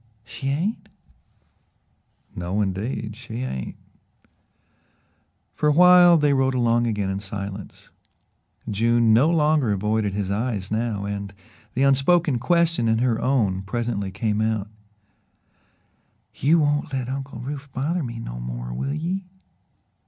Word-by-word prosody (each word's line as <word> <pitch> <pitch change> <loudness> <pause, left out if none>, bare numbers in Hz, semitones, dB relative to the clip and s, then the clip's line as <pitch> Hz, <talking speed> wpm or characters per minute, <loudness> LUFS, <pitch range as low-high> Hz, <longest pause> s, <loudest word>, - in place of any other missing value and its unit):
"She 135 +3 -7
ain't?" 170 +11 -2 1.5
"No, 90 +3 -2
indeed, 105 +2 -2
she 120 0 -6
ain't." 65 - -5 1.8
For 150 - +1
a - - +4
while 180 +1 +7
they 145 -2 +3
rode 135 -1 +1
along 120 -1 +2
again 105 -3 -1
in 95 - -3
silence. 100 0 -8 0.8
June 115 +2 +3
no 130 +8 +5
longer 150 -7 +2
avoided 105 0 0
his 100 -2 -2
eyes 105 -2 -2
now, 110 -2 -1
and 100 -1 -5 0.4
the 130 - +2
unspoken 140 +1 +3
question 165 -3 +2
in 110 0 +2
her 120 -1 +1
own 105 -9 +1
presently 100 0 -3
came 105 +2 -1
out: 110 -2 -1 1.6
"You 155 +6 +3
won't 145 -2 +1
let 130 -2 -2
Uncle 135 0 -5
Rufe 140 +2 -7
bother 155 +8 -1
me 120 -5 -5
no - - -6
more, - - -5
will 140 - -3
ye?" 180 +5 -3
120 Hz, 130 wpm, -23 LUFS, 100-140 Hz, 1.8 s, while